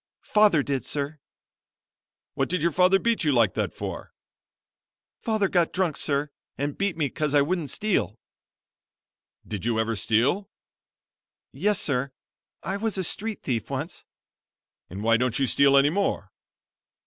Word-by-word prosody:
"Father 210 Hz, -8 st, +4 dB
did, 135 Hz, -2 st, -2 dB
sir." 145 Hz, +1 st, -3 dB, 1.1 s
"What -, -, -1 dB
did 180 Hz, -3 st, -1 dB
your 170 Hz, -, +3 dB
father 185 Hz, +4 st, +4 dB
beat 230 Hz, +1 st, 0 dB
you 150 Hz, -, +2 dB
like 115 Hz, -7 st, +3 dB
that -, -, -1 dB
for?" -, -, -7 dB, 1.1 s
"Father 220 Hz, -3 st, +1 dB
got 175 Hz, -3 st, +1 dB
drunk 180 Hz, -5 st, 0 dB
sir, 145 Hz, 0 st, -1 dB, 0.3 s
and 145 Hz, 0 st, -2 dB
beat 195 Hz, -4 st, -1 dB
me 150 Hz, -3 st, +1 dB
'cos 150 Hz, +2 st, -2 dB
I 145 Hz, -, +6 dB
wouldn't 165 Hz, -1 st, -2 dB
steal." 190 Hz, -, 0 dB, 1.3 s
"Did 105 Hz, -4 st, -5 dB
you 115 Hz, -1 st, 0 dB
ever 110 Hz, 0 st, 0 dB
steal?" 135 Hz, -, +1 dB, 1.0 s
"Yes, 210 Hz, -1 st, +1 dB
sir, 135 Hz, -5 st, -1 dB, 0.5 s
I 190 Hz, +5 st, -2 dB
was 220 Hz, -1 st, -1 dB
a 190 Hz, -, 0 dB
street 215 Hz, +4 st, -3 dB
thief 120 Hz, -4 st, -2 dB
once." 145 Hz, +6 st, -4 dB, 0.9 s
"And 95 Hz, +4 st, -7 dB
why 115 Hz, 0 st, +4 dB
don't 125 Hz, -1 st, 0 dB
you 140 Hz, -, +2 dB
steal 140 Hz, +2 st, +4 dB
any 140 Hz, +2 st, +4 dB
more?" 200 Hz, +3 st, -1 dB
150 Hz, 150 wpm, -25 LUFS, 130-190 Hz, 1.3 s, I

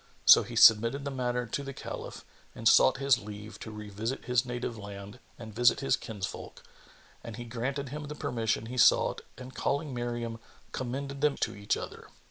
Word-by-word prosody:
So -, -, +9 dB
he -, -, -8 dB
submitted 115 Hz, +6 st, +6 dB
the 140 Hz, -, -3 dB
matter 125 Hz, -2 st, -2 dB
to 120 Hz, -, -3 dB
the 140 Hz, -1 st, -7 dB
Caliph -, -, -7 dB, 0.3 s
and 115 Hz, -, -1 dB
sought 130 Hz, +2 st, +6 dB
his 135 Hz, -2 st, +3 dB
leave 105 Hz, 0 st, -9 dB
to -, -, -8 dB
revisit 105 Hz, +3 st, -5 dB
his 125 Hz, +1 st, +1 dB
native 120 Hz, -1 st, -4 dB
land 100 Hz, +1 st, -9 dB, 0.2 s
and 110 Hz, -2 st, -10 dB
visit 120 Hz, +2 st, +4 dB
his 135 Hz, -, +2 dB
kinsfolk, 100 Hz, -3 st, -7 dB, 0.6 s
and 115 Hz, -, -7 dB
he 120 Hz, -, -7 dB
granted 130 Hz, +4 st, -3 dB
him 150 Hz, +2 st, -6 dB
the 150 Hz, -, -6 dB
permission 115 Hz, -5 st, -2 dB
he 125 Hz, +2 st, -5 dB
sought -, -, +4 dB, 0.2 s
and 130 Hz, 0 st, -10 dB
calling 145 Hz, +1 st, -2 dB
Miriam, 120 Hz, -1 st, -4 dB, 0.3 s
commended 140 Hz, +2 st, -4 dB
them 150 Hz, -1 st, +3 dB
each 100 Hz, +1 st, -4 dB
to -, -, -5 dB
other. -, -, -10 dB
120 Hz, 180 wpm, -29 LUFS, 110-135 Hz, 0.6 s, So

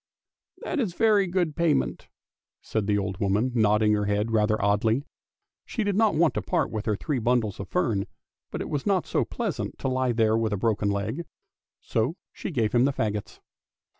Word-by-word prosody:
" -, -, -65 dB
That 320 Hz, -, -2 dB
is 200 Hz, -9 st, -1 dB
very 210 Hz, -3 st, +4 dB
good 175 Hz, -4 st, 0 dB
payment," 170 Hz, -4 st, 0 dB, 0.5 s
said 110 Hz, -3 st, -2 dB
the 105 Hz, -1 st, +2 dB
old 95 Hz, -2 st, -3 dB
woman, 105 Hz, +6 st, +1 dB
nodding 105 Hz, -2 st, +3 dB
her 105 Hz, -1 st, +1 dB
head 105 Hz, +2 st, 0 dB
rather 110 Hz, -1 st, +2 dB
oddly; 105 Hz, +6 st, +2 dB, 0.6 s
she 225 Hz, -, -3 dB
did 205 Hz, -2 st, 0 dB
not 215 Hz, -4 st, +3 dB
want 165 Hz, 0 st, +3 dB
to -, -, -1 dB
part 175 Hz, -3 st, 0 dB
with 110 Hz, -1 st, -4 dB
her 105 Hz, -, +2 dB
three 140 Hz, +5 st, -2 dB
bundles 115 Hz, -3 st, 0 dB
of 100 Hz, -, -6 dB
fern, 115 Hz, -, 0 dB, 0.4 s
but -, -, -5 dB
it -, -, -5 dB
was 145 Hz, +2 st, -2 dB
not 190 Hz, -3 st, +2 dB
so -, -, +1 dB
pleasant -, -, -4 dB
to 130 Hz, 0 st, -1 dB
he -, -, +2 dB
there 110 Hz, -2 st, +2 dB
with 110 Hz, -2 st, 0 dB
a -, -, 0 dB
broken 105 Hz, 0 st, +1 dB
leg, 105 Hz, +11 st, -2 dB, 0.6 s
so 115 Hz, +9 st, -1 dB, 0.2 s
she -, -, -5 dB
gave 115 Hz, -, 0 dB
him 120 Hz, +1 st, +4 dB
the 140 Hz, -, +1 dB
faggots. 105 Hz, -4 st, -3 dB
115 Hz, 195 wpm, -26 LUFS, 105-160 Hz, 0.6 s, very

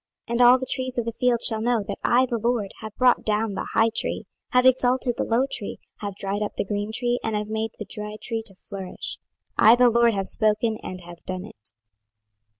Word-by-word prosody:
26:017:024 -, -, -5 dB
And 235 Hz, +1 st, +1 dB
all 245 Hz, +1 st, +8 dB
the 260 Hz, -, -4 dB
trees 255 Hz, 0 st, -3 dB
of 240 Hz, -, 0 dB
the 230 Hz, -, -2 dB
field 240 Hz, 0 st, +1 dB
shall 220 Hz, -2 st, +2 dB
know 235 Hz, -2 st, +1 dB
that 200 Hz, -1 st, -5 dB
I 250 Hz, +2 st, +4 dB
the 240 Hz, -2 st, -2 dB
LORD 230 Hz, -3 st, 0 dB
have 215 Hz, -1 st, -8 dB
brought 250 Hz, -1 st, +3 dB
down 215 Hz, 0 st, 0 dB
the -, -, -4 dB
high 225 Hz, 0 st, +4 dB
tree, -, -, -1 dB, 0.2 s
have 250 Hz, 0 st, +3 dB
exalted 255 Hz, -1 st, +3 dB
the -, -, -1 dB
low 235 Hz, +3 st, +2 dB
tree, 230 Hz, -6 st, -3 dB, 0.2 s
have 200 Hz, -2 st, -5 dB
dried 200 Hz, +1 st, -2 dB
up 210 Hz, -, -3 dB
the -, -, -1 dB
green 205 Hz, +1 st, -3 dB
tree, 245 Hz, +2 st, 0 dB
and 220 Hz, -1 st, -1 dB
have 210 Hz, 0 st, -3 dB
made 220 Hz, +1 st, -2 dB
the -, -, -6 dB
dry 210 Hz, -1 st, -5 dB
tree 225 Hz, -1 st, -2 dB
to 195 Hz, -, -14 dB
flourish: 190 Hz, -1 st, -7 dB, 0.4 s
I 220 Hz, +2 st, +8 dB
the 245 Hz, -1 st, +5 dB
LORD 235 Hz, -1 st, +4 dB
have 195 Hz, -1 st, -2 dB
spoken 220 Hz, 0 st, +1 dB
and 185 Hz, 0 st, -6 dB
have 170 Hz, -1 st, -12 dB
done 185 Hz, 0 st, -4 dB
it. 105 Hz, -, -10 dB
225 Hz, 230 wpm, -24 LUFS, 205-245 Hz, 0.4 s, all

